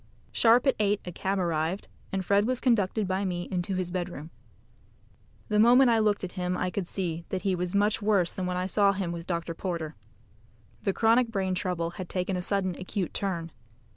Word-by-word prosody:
Sharp 235 +3 +4
at 270 - +4
eight 205 -1 +2
a 180 - -5
cab 190 +3 -2
arrived, 170 +1 -1 0.2
and 190 -1 -2
Fred 200 +3 +3
was 255 -1 0
conducted 215 -4 +1
by 190 +2 0
me 175 -2 -2
into 185 +1 -1
his 185 -1 -2
bedroom. 175 -4 -4 1.2
The 210 -2 +1
moment 245 +3 +6
I 225 - +4
looked 210 -2 +1
at 185 - -4
him 180 -1 -2
I 180 0 -1
could 190 -3 -3
see 170 -4 -3
that 190 -1 -3
he 195 -2 +1
was 180 +1 -2
much 205 +2 +2
worse 200 -5 +2
than 185 -1 -3
when 180 0 -2
I 180 - -1
saw 200 +1 +3
him 190 -3 -2
with 170 0 -6
Dr. 170 -1 -2
Porter. 165 -3 -4 0.9
The 195 - +1
chronic 230 +4 +3
brain 190 -4 -1
trouble 180 -3 -1
had 180 0 -7
taken 185 +1 -1
a 180 - -2
sudden 185 -1 0
acute 185 0 -3
turn. 170 -4 -3
185 Hz, 200 wpm, -28 LUFS, 175-205 Hz, 1.2 s, moment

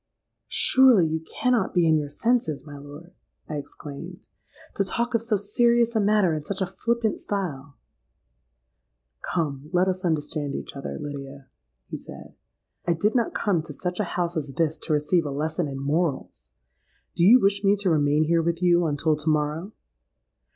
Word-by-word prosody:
'—'Surely 255 -9 +5
you 160 0 -1
cannot 230 +6 -1
be 175 -2 +4
in 160 - +4
your 150 -2 -1
senses, 200 - 0
my 145 -1 -10
lord,' 145 +5 -12 0.3
I 150 - -4
exclaimed, 155 +6 -8 0.5
'to 195 - 0
talk 235 +6 -2
of 230 - +2
so 225 -2 0
serious 235 +3 +2
a - - +3
matter 205 -4 +3
in 155 -1 -3
such 195 +5 -4
a 190 - +1
flippant 225 +4 -1
style?'—'Come, 65 - -7
let 180 +1 +2
us 185 0 -2
understand 150 -3 -1
each - - -7
other, 140 - -5
Lydia,' 140 -2 -8 0.4
he - - -5
said. - - -12 0.5
'I 170 - +3
did 205 +6 +1
not 235 -3 0
come 195 -7 +1
to 155 -1 -9
such 180 +3 -3
a - - +2
house 175 0 -1
as 145 -3 -3
this 160 0 0
to - - -5
receive 150 +4 +2
a - - -3
lesson 155 +4 -2
in 135 -1 -5
morals. 145 - -2 0.7
Do 170 - +1
you 230 +8 +8
wish 200 -1 +1
me 200 +1 +4
to 195 -3 0
remain 150 0 +3
here 165 +1 +2
with 170 0 -1
you 175 -1 +3
until 155 +1 +1
to 150 +1 -2
morrow?' 155 +5 -1
165 Hz, 170 wpm, -25 LUFS, 145-195 Hz, 0.7 s, you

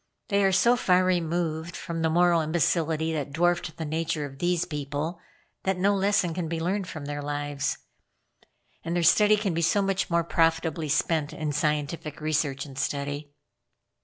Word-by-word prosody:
They 200 -1 +2
are 195 - +4
so 235 +6 +4
far 185 -6 +3
removed 170 -2 -1
from 165 -2 -4
the 160 - +2
moral 170 0 +4
imbecility 160 0 0
that 145 -2 -3
dwarfed 170 +1 0
the 160 - -4
nature 155 -1 -2
of 135 -1 -10
these 175 -1 +1
people, 150 +3 -4 0.4
that 190 -1 0
no 200 +3 +3
lesson 195 -3 +1
can 175 -1 -3
be 165 0 -3
learned 185 +3 -1
from 155 -4 -7
their 145 0 -4
lives; 145 0 -2 1.1
and 170 +1 -2
their 175 - +1
time 210 +4 +5
can 200 -4 -1
be 165 - -1
so 170 +5 +2
much 195 -1 0
more 170 -1 +2
profitably 165 -1 +1
spent 150 +1 +1
in 155 -1 -3
scientific 150 +1 -2
research 150 -3 -1
and 135 -1 -9
study." 145 +1 -3
165 Hz, 170 wpm, -26 LUFS, 150-175 Hz, 1.1 s, time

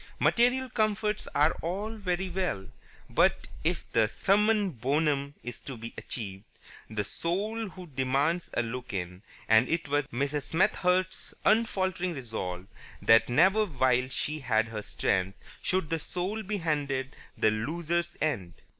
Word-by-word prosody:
Material 250 +2 +3
comforts 215 -2 0
are 150 +3 +5
all 200 +6 -3
very 190 -3 -1
well, 180 - -2 0.4
but, - - +3 0.2
if - - 0
the 110 -2 +4
summum 205 - +2
bonum 140 +2 0
is 120 +1 -6
to 135 -3 -7
be 115 +1 -7
achieved, 100 -5 -6 0.5
the 110 -1 -1
Soul 205 - -2
also 185 0 -10
demands 140 +4 0
a 120 - +2
look 125 +1 -5
in, 90 -1 -4 0.3
and 110 +3 +5
it 165 -1 0
was 145 -1 +1
Mrs. 140 +3 -1
Smethurst's 185 +1 +1
unfaltering 185 -5 +2
resolve 95 -8 -4 0.3
that 115 +1 +5
never 190 - +5
while 130 -4 +2
she 150 +3 -2
had 110 -4 +1
her 110 -1 -4
strength 95 -1 -1 0.2
should 185 -4 0
the 165 - +1
Soul 185 +7 -3
be 210 0 -2
handed 145 -6 -1 0.2
the 110 - +4
loser's 170 +9 -1
end. 100 - -1
150 Hz, 140 wpm, -29 LUFS, 120-185 Hz, 0.5 s, are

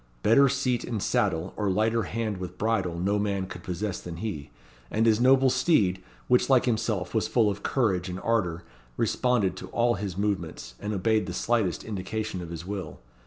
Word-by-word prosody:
Better 140 +5 +6
seat 130 -3 0
in 115 - -3
saddle, 85 -1 0
or 105 -2 -1
lighter 110 +4 +2
hand 110 -3 -2
with 90 -1 -7
bridle, 95 -6 0
no 100 +4 +1
man 100 -2 -1
could 90 -1 -9
possess 90 +3 -3
than 85 -2 -7
he; 80 -7 -5 0.4
and 110 +1 +1
his 110 0 +4
noble 130 +1 +5
steed, 125 - +2 0.3
which 125 +2 +3
like 130 -2 +5
himself 110 -6 -1
was 110 - +1
full 110 -4 +3
of 100 +1 -6
courage 95 -9 0
and 90 +1 -5
ardour, 90 -7 0 0.3
responded 125 -7 +1
to - - -7
all 120 0 +2
his 95 -3 -4
movements, 90 -11 -2
and 105 - -4
obeyed 110 +2 +1
the - - -4
slightest 110 -7 0
indication 105 -1 -4
of 85 - -7
his 85 0 -7
will. 100 0 -5
105 Hz, 185 wpm, -27 LUFS, 90-115 Hz, 0.4 s, Better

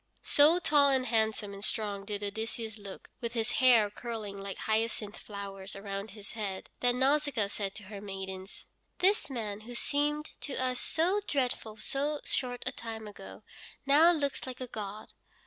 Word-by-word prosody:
So 300 +4 +6
tall 295 -5 +5
and 265 -2 +3
handsome 220 -3 +1
and 200 0 -8
strong 205 -3 0
did 205 0 -3
Odysseus 220 +2 -3
look, 200 -2 -9
with 235 -1 -3
his 230 -1 0
hair 235 -5 +6
curling 220 -3 -5
like 195 -1 -5
hyacinth 220 -1 0
flowers 195 -2 -7
around 200 +1 -4
his 205 0 -10
head, 200 -4 -4
that 245 0 +3
Nausicaa 275 -3 +3
said 200 -1 -3
to 215 - -7
her 200 +1 -8
maidens: 190 -1 -6 0.3
"This 390 -1 +3
man, 215 -6 -3
who 240 +2 -8
seemed 295 +4 0
to 280 - -4
us 255 0 0
so 360 +6 +1
dreadful 245 -5 -1
so 285 +7 -1
short 245 -2 -1
a 255 - 0
time 225 -4 -6
ago, 205 +1 -10 0.4
now 300 +5 +7
looks 285 -5 -1
like 255 -1 -6
a 255 - -3
god. 215 -2 -6
220 Hz, 165 wpm, -31 LUFS, 205-265 Hz, 0.4 s, now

